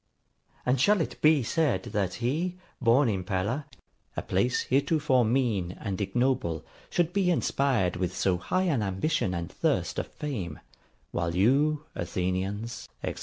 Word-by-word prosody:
And 125 Hz, 0 st, +2 dB
shall 210 Hz, +6 st, +5 dB
it 165 Hz, -, -3 dB
be 155 Hz, -3 st, +5 dB
said 125 Hz, -, +1 dB
that 100 Hz, -3 st, 0 dB
he, 160 Hz, +10 st, -1 dB, 0.2 s
born 125 Hz, +3 st, +5 dB
in 95 Hz, -4 st, 0 dB
Pella, 105 Hz, +10 st, -1 dB, 0.5 s
a -, -, -1 dB
place 110 Hz, +7 st, +1 dB
heretofore 135 Hz, -1 st, +2 dB
mean 110 Hz, -7 st, 0 dB
and 100 Hz, -2 st, -3 dB
ignoble, 100 Hz, -, 0 dB, 0.2 s
should 175 Hz, 0 st, +1 dB
be 195 Hz, -2 st, +2 dB
inspired 135 Hz, -, +1 dB
with 90 Hz, 0 st, -2 dB
so 95 Hz, -2 st, +2 dB
high 185 Hz, -, 0 dB
an 150 Hz, -11 st, +1 dB
ambition 95 Hz, -, 0 dB
and 85 Hz, 0 st, -4 dB
thirst -, -, 0 dB
of -, -, -3 dB
fame: 105 Hz, -, -5 dB, 0.5 s
while 85 Hz, -1 st, -1 dB
you, 140 Hz, +10 st, +3 dB
Athenians, 95 Hz, +5 st, -3 dB, 0.2 s
&c.' -, -, -1 dB
120 Hz, 145 wpm, -28 LUFS, 95-145 Hz, 0.5 s, shall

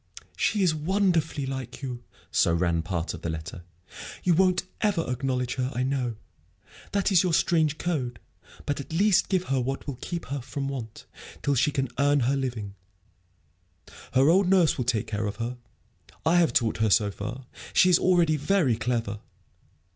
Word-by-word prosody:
"She 210 Hz, -3 st, +1 dB
is 175 Hz, -4 st, +3 dB
wonderfully 165 Hz, -3 st, 0 dB
like 130 Hz, 0 st, -6 dB
you," 125 Hz, -2 st, -5 dB, 0.3 s
so 85 Hz, -, +3 dB
ran 85 Hz, -1 st, +1 dB
part 85 Hz, 0 st, -3 dB
of 80 Hz, -, -8 dB
the 85 Hz, -, -3 dB
letter. 80 Hz, +2 st, -6 dB, 0.6 s
"You 180 Hz, -, +3 dB
won't 185 Hz, +2 st, +3 dB, 0.2 s
ever 200 Hz, -6 st, +1 dB
acknowledge 125 Hz, 0 st, -1 dB
her, 130 Hz, 0 st, -1 dB
I 125 Hz, -, 0 dB
know. 130 Hz, -3 st, -1 dB, 0.8 s
That 200 Hz, 0 st, +1 dB
is 180 Hz, -3 st, +6 dB
your 180 Hz, -3 st, +1 dB
strange 155 Hz, -4 st, +2 dB
code. 130 Hz, -10 st, -2 dB, 0.5 s
But 145 Hz, -, -2 dB
at 140 Hz, -, -8 dB
least 195 Hz, +3 st, +3 dB
give 185 Hz, -2 st, +1 dB
her 135 Hz, -7 st, 0 dB
what 135 Hz, +2 st, -3 dB
will 135 Hz, -4 st, -6 dB
keep 175 Hz, -1 st, -4 dB
her 140 Hz, -, -3 dB
from 135 Hz, +2 st, -4 dB
want, 115 Hz, -6 st, -7 dB, 0.4 s
till 145 Hz, -, +2 dB
she 135 Hz, +2 st, +3 dB
can 135 Hz, -2 st, -1 dB
earn 145 Hz, 0 st, +3 dB
her 130 Hz, +3 st, +2 dB
living. 120 Hz, -7 st, -3 dB, 1.4 s
Her 135 Hz, +1 st, +4 dB
old 180 Hz, +3 st, +4 dB
nurse 185 Hz, -4 st, +4 dB
will 125 Hz, -, -2 dB
take 115 Hz, -4 st, 0 dB
care 105 Hz, 0 st, -2 dB
of 100 Hz, -, -4 dB
her, 120 Hz, +3 st, -4 dB, 0.7 s
I 165 Hz, +2 st, +4 dB
have 170 Hz, -2 st, +4 dB
taught 115 Hz, -3 st, +1 dB
her, 110 Hz, 0 st, +2 dB
so 100 Hz, +1 st, +3 dB
far. 120 Hz, +6 st, -6 dB, 0.3 s
She 185 Hz, -, +5 dB
is 175 Hz, -, +5 dB
already 170 Hz, -4 st, +3 dB
very 145 Hz, -, +2 dB
clever. 115 Hz, -4 st, -2 dB
135 Hz, 175 wpm, -26 LUFS, 120-170 Hz, 1.4 s, is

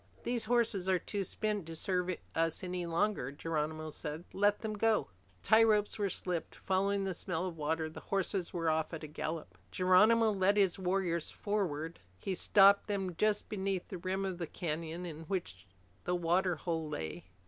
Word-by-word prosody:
"These 240 Hz, -2 st, 0 dB
horses 215 Hz, -5 st, +1 dB
are 185 Hz, -, +4 dB
too 200 Hz, +3 st, -3 dB
spent 210 Hz, -2 st, -2 dB
to 165 Hz, -, -6 dB
serve 180 Hz, +1 st, -1 dB, 0.2 s
us 165 Hz, +1 st, 0 dB
any 180 Hz, -1 st, -3 dB
longer," 170 Hz, -5 st, 0 dB
Geronimo 155 Hz, +1 st, -3 dB
said. 150 Hz, +2 st, -5 dB
"Let 205 Hz, +1 st, +2 dB
them 220 Hz, -1 st, -3 dB
go." 215 Hz, -, +1 dB, 0.3 s
Tie 220 Hz, +1 st, +6 dB
ropes 215 Hz, -2 st, +3 dB
were 200 Hz, -1 st, +1 dB
slipped. 180 Hz, -2 st, -3 dB
Following 195 Hz, +1 st, 0 dB
the 190 Hz, -1 st, -1 dB
smell 180 Hz, 0 st, -2 dB
of 180 Hz, -3 st, -4 dB
water, 160 Hz, +1 st, -1 dB
the 155 Hz, -, -9 dB
horses 195 Hz, -2 st, -1 dB
were 165 Hz, -2 st, -2 dB
off 160 Hz, +1 st, +1 dB
at 160 Hz, -, -8 dB
a -, -, -5 dB
gallop. 150 Hz, -, -5 dB
Geronimo 215 Hz, +5 st, +5 dB
led 200 Hz, 0 st, +2 dB
his 195 Hz, -2 st, +3 dB
warriors 180 Hz, -3 st, 0 dB
forward. 170 Hz, -6 st, -2 dB, 0.2 s
He 195 Hz, -, -3 dB
stopped 200 Hz, +2 st, +5 dB
them 195 Hz, -4 st, -2 dB
just 210 Hz, +3 st, +1 dB
beneath 195 Hz, -3 st, -2 dB
the 185 Hz, -, -5 dB
rim 190 Hz, +2 st, -1 dB
of 185 Hz, -2 st, -3 dB
the 170 Hz, -, -3 dB
canyon 165 Hz, +1 st, -4 dB
in 160 Hz, -1 st, -7 dB
which 100 Hz, -, -4 dB, 0.4 s
the 180 Hz, -, +1 dB
water 175 Hz, +1 st, +2 dB
hole 160 Hz, -1 st, -3 dB
lay. 85 Hz, -, -5 dB
180 Hz, 180 wpm, -33 LUFS, 160-200 Hz, 0.4 s, Tie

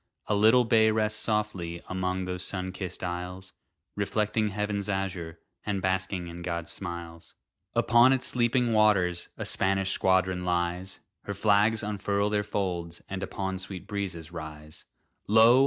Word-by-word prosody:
A -, -, 0 dB
little 110 Hz, +4 st, +5 dB
bay 110 Hz, -1 st, +5 dB
rests 110 Hz, 0 st, +1 dB
softly 100 Hz, -6 st, -1 dB
Among 95 Hz, 0 st, -2 dB
those 90 Hz, 0 st, -4 dB
sun 95 Hz, -1 st, -3 dB
kissed 95 Hz, -1 st, -6 dB
isles, 90 Hz, +1 st, -5 dB, 0.4 s
Reflecting 105 Hz, +1 st, 0 dB
heaven's 105 Hz, 0 st, -2 dB
azure, 90 Hz, -4 st, -3 dB, 0.3 s
And 100 Hz, -2 st, -1 dB
basking 95 Hz, -1 st, -1 dB
in 85 Hz, +1 st, -8 dB
God's 85 Hz, -1 st, -3 dB
smiles. 85 Hz, -2 st, -7 dB, 0.4 s
Upon 120 Hz, +2 st, +5 dB
its 130 Hz, -1 st, +2 dB
sleeping 120 Hz, 0 st, +2 dB
waters 100 Hz, -5 st, +3 dB
A -, -, -3 dB
Spanish 95 Hz, 0 st, +2 dB
squadron 95 Hz, -1 st, +2 dB
lies; 90 Hz, +1 st, -1 dB, 0.2 s
Her 100 Hz, -, -4 dB
flags 105 Hz, +2 st, +3 dB
unfurl 100 Hz, 0 st, 0 dB
their 105 Hz, -1 st, +2 dB
folds, 90 Hz, -5 st, -3 dB
and 95 Hz, -1 st, -3 dB
Upon 95 Hz, -1 st, -3 dB
sweet 95 Hz, -2 st, -4 dB
breezes 95 Hz, -6 st, -4 dB
rise. 75 Hz, -2 st, -9 dB, 0.4 s
Lo! 115 Hz, +4 st, +7 dB
95 Hz, 140 wpm, -28 LUFS, 90-105 Hz, 0.4 s, Lo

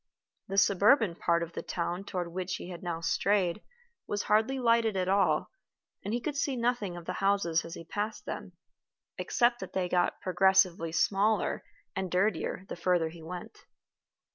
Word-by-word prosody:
The 195 Hz, -, -4 dB
suburban 200 Hz, +2 st, +5 dB
part 170 Hz, 0 st, +1 dB
of 170 Hz, 0 st, -7 dB
the -, -, -4 dB
town 175 Hz, +2 st, -3 dB
toward 180 Hz, -4 st, -4 dB
which 185 Hz, 0 st, -2 dB
he -, -, -7 dB
had 175 Hz, -2 st, -8 dB
now 170 Hz, -2 st, -3 dB
strayed 190 Hz, +3 st, +1 dB, 0.5 s
was 205 Hz, -1 st, -2 dB
hardly 220 Hz, +6 st, +2 dB
lighted 230 Hz, -4 st, +2 dB
at 185 Hz, -1 st, 0 dB
all, 195 Hz, +1 st, +2 dB, 0.5 s
and 205 Hz, -, -3 dB
he 240 Hz, -, 0 dB
could 290 Hz, +4 st, -3 dB
see 280 Hz, -1 st, 0 dB
nothing 235 Hz, -7 st, -1 dB
of 170 Hz, -, -9 dB
the -, -, -3 dB
houses 195 Hz, -5 st, +2 dB
as 165 Hz, -, -8 dB
he -, -, -8 dB
passed 210 Hz, +5 st, -4 dB
them, -, -, -6 dB, 0.7 s
except 240 Hz, 0 st, +2 dB
that -, -, -8 dB
they 185 Hz, -1 st, 0 dB
got 175 Hz, 0 st, +1 dB
progressively 185 Hz, -2 st, +3 dB
smaller 200 Hz, +4 st, +1 dB, 0.3 s
and 190 Hz, -1 st, -2 dB
dirtier 185 Hz, 0 st, 0 dB
the -, -, -5 dB
further 175 Hz, -2 st, +1 dB
he 165 Hz, +1 st, -12 dB
went. 180 Hz, +7 st, -8 dB
190 Hz, 170 wpm, -30 LUFS, 175-215 Hz, 0.7 s, suburban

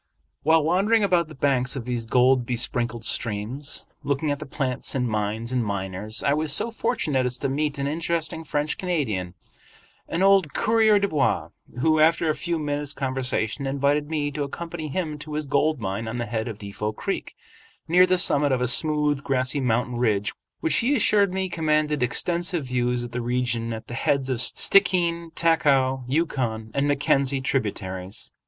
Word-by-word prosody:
While 160 Hz, +1 st, +4 dB
wandering 200 Hz, +7 st, +2 dB
about 175 Hz, -4 st, +2 dB
the 155 Hz, -, -12 dB
banks 130 Hz, -2 st, +1 dB
of 130 Hz, -4 st, -5 dB
these 120 Hz, -2 st, -3 dB
gold 125 Hz, +1 st, +4 dB
besprinkled 120 Hz, -1 st, -1 dB
streams, 115 Hz, +7 st, -2 dB, 0.2 s
looking 145 Hz, +1 st, -1 dB
at 145 Hz, -, -2 dB
the -, -, -8 dB
plants 135 Hz, -2 st, -2 dB
and 125 Hz, -2 st, 0 dB
mines 110 Hz, +2 st, -2 dB
and 125 Hz, -2 st, +1 dB
miners, 100 Hz, +1 st, -3 dB
I 140 Hz, -, +3 dB
was 155 Hz, 0 st, 0 dB
so 230 Hz, +10 st, +1 dB
fortunate 195 Hz, -, 0 dB
as 125 Hz, 0 st, -3 dB
to 135 Hz, -, -2 dB
meet 150 Hz, +2 st, -1 dB
an 140 Hz, -, -2 dB
interesting 160 Hz, +1 st, -2 dB
French 150 Hz, 0 st, -2 dB
Canadian, 110 Hz, -, -2 dB, 0.7 s
an 170 Hz, +3 st, -1 dB
old 195 Hz, -6 st, +4 dB
coureur 220 Hz, -1 st, +4 dB
de 200 Hz, 0 st, +1 dB
bois, 150 Hz, -6 st, 0 dB, 0.3 s
who 155 Hz, +1 st, +3 dB
after 165 Hz, +1 st, +4 dB
a 155 Hz, -, +2 dB
few 170 Hz, +3 st, -2 dB
minutes' 145 Hz, -1 st, -2 dB
conversation 130 Hz, -1 st, -2 dB
invited 140 Hz, +2 st, 0 dB
me 150 Hz, -2 st, -1 dB
to 145 Hz, -, -4 dB
accompany 165 Hz, +3 st, -5 dB
him 155 Hz, -1 st, -3 dB
to 150 Hz, 0 st, -7 dB
his 155 Hz, 0 st, -2 dB
gold 145 Hz, +1 st, +1 dB
mine 105 Hz, +1 st, -3 dB
on 115 Hz, +2 st, -4 dB
the 120 Hz, -, -2 dB
head 115 Hz, -1 st, -3 dB
of 110 Hz, -3 st, -5 dB
Defot 105 Hz, +1 st, -5 dB
Creek, -, -, -4 dB, 0.5 s
near 180 Hz, +3 st, +5 dB
the 185 Hz, 0 st, +3 dB
summit 145 Hz, -5 st, +3 dB
of 130 Hz, -, +2 dB
a 125 Hz, -, 0 dB
smooth, 150 Hz, +1 st, +2 dB
grassy 130 Hz, +1 st, 0 dB
mountain 125 Hz, 0 st, 0 dB
ridge 105 Hz, -4 st, 0 dB, 0.3 s
which 160 Hz, -, +2 dB
he 265 Hz, +5 st, +2 dB
assured 205 Hz, -5 st, +3 dB
me 190 Hz, 0 st, -1 dB
commanded 155 Hz, -4 st, 0 dB
extensive 170 Hz, +6 st, +1 dB
views 125 Hz, -1 st, -1 dB
of 120 Hz, -, -7 dB
the 125 Hz, +1 st, -3 dB
region 120 Hz, -1 st, -1 dB
at 110 Hz, -1 st, -6 dB
the -, -, -9 dB
heads 135 Hz, +2 st, 0 dB
of 125 Hz, -2 st, 0 dB
Stickeen, 170 Hz, 0 st, +2 dB
Taku, 135 Hz, -6 st, +2 dB
Yukon, 125 Hz, -7 st, -1 dB
and 140 Hz, +1 st, +1 dB
Mackenzie 140 Hz, -1 st, +1 dB
tributaries. 100 Hz, -7 st, -3 dB
140 Hz, 175 wpm, -24 LUFS, 120-160 Hz, 0.7 s, near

